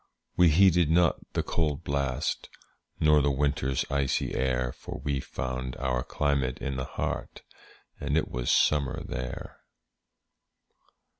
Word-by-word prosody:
We 90 -1 +6
heeded 90 -1 +5
not 85 +1 +4 0.2
the - - 0
cold 75 -2 -1
blast, 70 -1 -1 0.5
Nor 75 -1 +5
the 70 - +2
winter's 70 -1 0
icy 70 -1 0
air; 65 -1 0
For - - -8
we 70 -2 0
found 65 0 -4
our 65 -2 0
climate 70 -4 0
in 70 -1 -4
the 65 0 -3
heart, - - -4 0.6
And 70 +2 0
it 80 - +1
was - - -2
summer 75 0 +2
there. 65 0 -6
70 Hz, 130 wpm, -28 LUFS, 65-75 Hz, 0.6 s, We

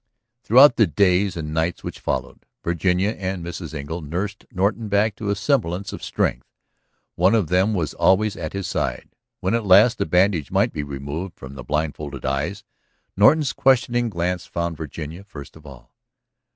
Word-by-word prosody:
Throughout 125 +4 +6
the 110 - +5
days 90 +2 +2
and 75 -2 -5
nights 80 +2 -1
which - - -6
followed, 65 -2 -4 0.2
Virginia 90 +4 +1
and 95 -4 -4
Mrs. 85 -1 -6
Engle 75 +4 -5
nursed 95 +7 -5
Norton 105 +4 0
back 100 +2 +2
into 105 0 -5
a 100 - +1
semblance 100 - -1
of - - -8
strength. - - -1 0.7
One 90 +5 +3
of 105 -8 +1
them 95 +4 +2
was 80 -6 -2
always 105 +2 +2
at 80 -6 -6
his 100 -1 -4
side. - - -3 0.3
When 95 - 0
at 115 -1 +1
last 105 +5 +5
the - - 0
bandage 90 -2 +2
might - - +1
be 75 - -3
removed 70 +6 -6
from 65 0 -10
the 65 -2 -9
blindfolded 75 -1 -3
eyes 75 +10 -2 0.5
Norton's 135 +8 +4
questing 120 -2 +2
glance 90 -1 -2
found 85 -1 -3
Virginia 80 +3 -7
first 80 -7 -11
of 75 -1 -15
all. 65 -4 -14
90 Hz, 170 wpm, -22 LUFS, 80-100 Hz, 0.7 s, Throughout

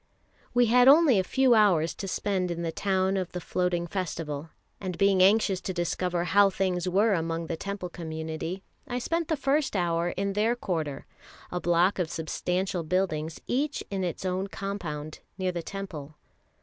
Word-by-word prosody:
We 245 0 +5
had 245 +2 +5
only 280 - +7
a - - +2
few 265 +5 +3
hours 185 -7 +4
to 195 - -6
spend 190 -1 -1
in 170 0 -3
the 165 - -1
town 190 +1 0
of 185 -2 -3
the 180 - -3
Floating 175 0 -1
Festival; 165 -4 -4 0.3
and 185 -3 -4
being 195 -1 +4
anxious 195 -1 +4
to 185 0 -4
discover 175 0 -1
how 200 +3 +5
things 185 -2 -1
were 205 +4 +3
among 165 -1 -1
the 165 - -3
Temple 195 +1 -5
community, 160 +2 -5 0.2
I 245 -2 -2
spent 330 +6 -1
the 320 -2 0
first 275 -1 +1
hour 170 -2 +1
in 195 +2 -2
their 220 +4 +2
quarter, 160 - -3 0.5
a 180 - -2
block 175 +3 +2
of 175 -3 0
substantial 180 +3 -2
buildings 160 -2 -1
each 285 +4 -1
in 195 -1 -1
its 180 +1 -3
own 185 +1 -1
compound, 170 -7 -5 0.2
near 185 -1 0
the 175 -1 -4
Temple. 160 -6 -7
185 Hz, 175 wpm, -27 LUFS, 170-200 Hz, 0.5 s, only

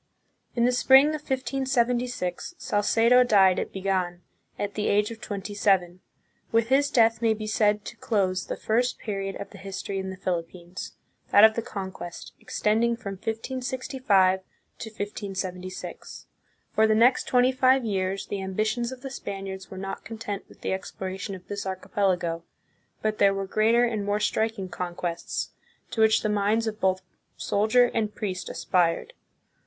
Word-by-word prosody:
In 235 -1 +3
the 250 - +4
spring 265 +3 +6
of 310 -1 -3
1576, 250 - -1
Salcedo 230 +2 +4
died 195 -6 +5
at - - -4
Bigan, 185 -2 -1 0.4
at 205 0 -3
the 210 - -1
age 210 +2 +2
of 225 0 -9
twenty 205 -1 -5
seven. 185 -3 +2 0.5
With 230 0 +2
his 280 +2 +4
death 225 -3 +3
may 225 -1 +3
be 215 0 -6
said 210 -1 +1
to - - -7
close 185 -4 0
the - - -3
first 245 +3 0
period 195 -2 -4
of 200 - -7
the 195 - -12
history 195 0 -4
in 190 0 -4
the 190 - -7
Philippines, 175 -1 -5 0.4
that 205 - +7
of 220 0 +8
the 230 - -2
Conquest, 190 -5 -7
extending 230 +3 +1
from 200 -3 -6
1565 225 -2 0 0.4
to 225 - -6
1576. 195 -3 -6 0.5
For 220 0 +4
the 215 - +3
next 240 +4 +4
twenty 250 0 +4
five 260 -1 +3
years 195 -2 -1
the 200 - -4
ambitions 215 +5 -1
of 260 -1 -9
the 270 0 -6
Spaniards 195 -4 -6
were 190 - -9
not 195 +1 -5
content 215 -3 -6
with - - -18
the - - -1
exploration 190 +1 -5
of 185 -1 -13
this 205 -1 -4
archipelago, 185 -3 -1 0.6
but 215 0 0
there 200 -1 +5
were 195 0 -2
greater 220 +4 +3
and 225 -4 0
more 205 +1 0
striking 220 -1 0
conquests, 175 -1 -4 0.4
to 225 - -1
which 220 0 +4
the - - +1
minds 210 +2 +1
of 215 -1 -4
both 185 0 +1 0.3
soldier 220 +4 +3
and 215 -2 -1
priest 185 -3 -4
aspired. 180 - 0
205 Hz, 160 wpm, -26 LUFS, 190-230 Hz, 0.6 s, of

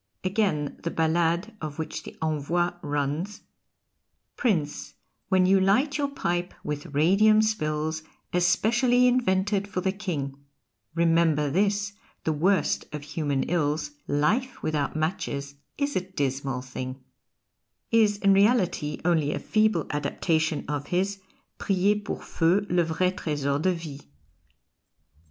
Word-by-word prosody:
Again, 185 -7 0
the 170 - -2
ballade 170 +6 +1
of 150 -2 -5
which 160 - -4
the - - -11
"Envoi" 160 +3 0
runs: 145 +7 -2 0.9
Prince, 165 - -1 0.3
when 185 -1 +4
you 190 +1 +5
light 255 +11 +2
your 285 - +1
pipe 175 -10 -2
with 150 -1 -4
radium 195 +9 +4
spills, 155 -6 -1 0.3
Especially 230 +8 +3
invented 205 -5 +2
for 185 -2 -3
the 190 - +1
King 145 -9 -4 0.5
Remember 165 -3 +3
this, 200 +3 +1 0.3
the 160 - +1
worst 180 +3 +1
of 150 -1 -6
human 145 -2 -1
ills: 160 - 0 0.2
Life 215 - 0
without 150 -2 -1
matches 150 -3 -2 0.2
is 285 0 -1
a - - +2
dismal 135 -7 -3
thing, 130 +1 -6 0.9
is, 215 -3 +4
in 200 -1 +4
reality, 195 -8 +2
only 160 -4 +2
a - - -2
feeble 215 -6 +1
adaptation 155 +2 0
of 145 -1 -3
his 195 +3 0 0.4
"Priez 200 +2 +1
pour - - -4
feu 180 +5 +2
le 175 -1 +3
vrai 175 +3 +1
tresor 145 -5 -1
de 185 +2 +2
vie." 155 -4 -7
175 Hz, 125 wpm, -26 LUFS, 150-200 Hz, 0.9 s, you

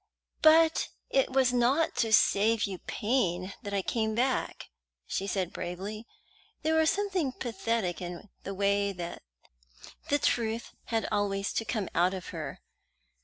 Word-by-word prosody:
"But 320 +1 +6 0.2
it 270 -1 +2
was 260 -1 +3
not 255 +7 +2
to 225 -2 +1
save 220 +1 +4
you 190 -3 -2
pain 195 -5 -1
that 205 -4 -6
I 200 -1 0
came 220 0 0
back," 260 +3 -1 0.3
she 195 - -3
said 190 -3 -1
bravely. 195 +6 -5 0.6
There 315 +1 +2
was 320 0 +4
something 380 -9 0
pathetic 225 -6 -2
in 175 +3 -7
the 195 - -6
way 200 0 +1
the 175 -2 -6 1.0
truth 230 -4 0
had 225 -2 -1
always 200 -1 0
to 225 - -1
come 210 -4 -2
out 180 +3 +3
of 185 - -7
her. - - -6
215 Hz, 140 wpm, -29 LUFS, 195-250 Hz, 1.0 s, But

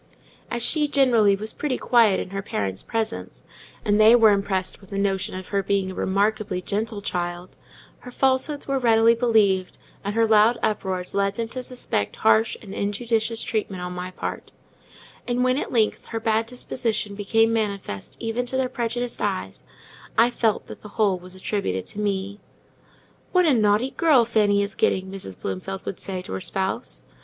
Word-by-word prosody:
As 240 -2 0
she, 300 +4 +3
generally, 240 -8 +4
was 215 +2 -3
pretty 285 -4 -2
quiet 230 -5 +4
in 185 - -5
her 195 0 -3
parents' 100 - -3
presence, 225 0 -4 0.4
and 210 0 +3
they 220 +2 +8
were 225 -3 +6
impressed 195 -2 -1
with 195 - -17
the 200 - -4
notion 195 -2 -1
of 185 0 -7
her 200 -1 +1
being 195 -1 0
a - - -7
remarkably 200 0 0
gentle 210 +3 -3
child, 175 -2 -4 0.4
her 250 - -10
falsehoods 265 +3 0
were 275 -1 0
readily 230 -1 +5
believed, 215 -6 +2 0.3
and 205 +1 -3
her 230 0 +4
loud 220 +2 +5
uproars 190 -4 -2
led 200 0 +1
them 230 0 -3
to 255 +2 -5
suspect 250 - -2
harsh 110 0 +3
and 195 -2 -9
injudicious 225 +2 -1
treatment 195 -4 -3
on 180 0 -5
my 180 0 -5
part; 185 - -6 0.8
and 245 0 +1
when, 255 +2 +2
at - - -4
length, 220 -3 +1
her 225 - -4
bad 225 0 +1
disposition 230 -4 -2
became 225 +3 +2
manifest 200 - -3
even 235 +2 -2
to 260 - -2
their 260 -1 0
prejudiced 240 0 -3
eyes, 95 -8 -3 0.5
I 235 +2 +5
felt 225 -3 0
that - - -11
the 210 - -10
whole 200 -4 +2
was 180 +1 -12
attributed 185 - -2
to 210 - -6
me. 200 0 -2 0.9
"What 365 -1 +4
a 305 - +4
naughty 215 +3 +2
girl 290 -8 +4
Fanny 205 -3 +2
is 200 0 -4
getting!" 190 0 0
Mrs. 185 - -7
Bloomfield 100 - -5
would 195 - -5
say 185 -2 -5
to - - -7
her 95 - -3
spouse. - - -3
210 Hz, 180 wpm, -24 LUFS, 190-230 Hz, 0.9 s, they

